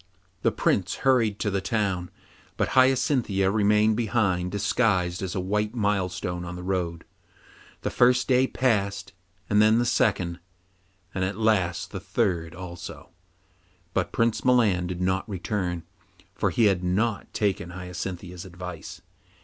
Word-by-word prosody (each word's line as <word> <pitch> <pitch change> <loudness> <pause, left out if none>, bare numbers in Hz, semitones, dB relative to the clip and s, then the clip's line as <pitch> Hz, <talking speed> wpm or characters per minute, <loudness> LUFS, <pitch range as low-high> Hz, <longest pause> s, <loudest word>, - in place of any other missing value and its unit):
The - - +3
Prince - - 0
hurried 115 -6 +3
to 105 - 0
the 100 0 0
town, 95 -3 -1 0.5
but - - +1
Hyacinthia 130 -7 +3
remained 105 +1 +3
behind 100 -6 0
disguised 100 -3 +1
as 95 +1 -3
a - - 0
white 105 +4 -1
milestone 90 -4 -1
on 90 0 -6
the 90 - -7
road. 90 -3 -2 0.8
The - - -1
first 125 +1 +4
day 130 0 +4
passed, 100 -8 0 0.3
and 105 0 +4
then 110 +1 +5
the 120 - +2
second, 95 -7 +1 0.7
and 95 - -1
at 95 +2 -2
last 100 -6 +1
the 95 - -5
third 95 -4 -1
also, 90 -1 -9 0.8
but 90 - 0
Prince 115 -1 +1
Milan 110 -9 +3
did 90 0 -4
not 95 +2 0
return, 90 -3 -2 0.5
for - - 0
he 120 - +1
had 95 -3 +2
not 100 +4 0
taken 95 -4 -1
Hyacinthia's 90 0 -6
advice. 90 -2 -8
95 Hz, 140 wpm, -26 LUFS, 90-110 Hz, 0.8 s, then